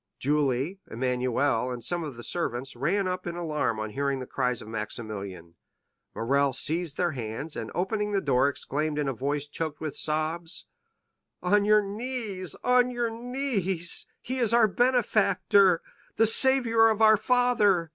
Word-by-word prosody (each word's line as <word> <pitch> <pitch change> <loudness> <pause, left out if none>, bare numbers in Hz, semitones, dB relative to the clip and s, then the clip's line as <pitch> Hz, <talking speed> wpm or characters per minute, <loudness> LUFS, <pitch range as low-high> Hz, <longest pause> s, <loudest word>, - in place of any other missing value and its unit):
Julie, 145 +4 0
Emmanuel, 125 +1 0
and 125 -2 -5
some 175 +7 0
of 145 -5 -6
the 120 - -9
servants, 130 -6 -2
ran 185 +10 0
up 180 0 -3
in 170 - -4
alarm 150 -9 -1
on 110 0 -4
hearing 140 +2 -1
the 130 - -5
cries 125 -2 -1
of - - -9
Maximilian. 105 -5 -6 0.6
Morrel 140 +4 +1
seized 160 +3 -2
their 175 -1 +1
hands, 125 +4 -5
and - - -5
opening 210 +3 -1
the 200 - +2
door 140 -4 +2
exclaimed 150 +2 -3
in 150 -2 0
a 135 - 0
voice 140 +4 -2
choked 155 0 -4
with 155 -2 -4
sobs: 160 +3 -2 0.8
"On 200 +3 +3
your 210 0 +5
knees—on 230 - -1
your 240 -2 -1
knees—he 235 -2 -3
is 235 -4 +1
our 235 -2 +6
benefactor—the 215 -4 +2
saviour 230 -1 +4
of 220 0 +1
our 215 0 +8
father! 210 -7 +2
165 Hz, 145 wpm, -27 LUFS, 135-210 Hz, 0.8 s, our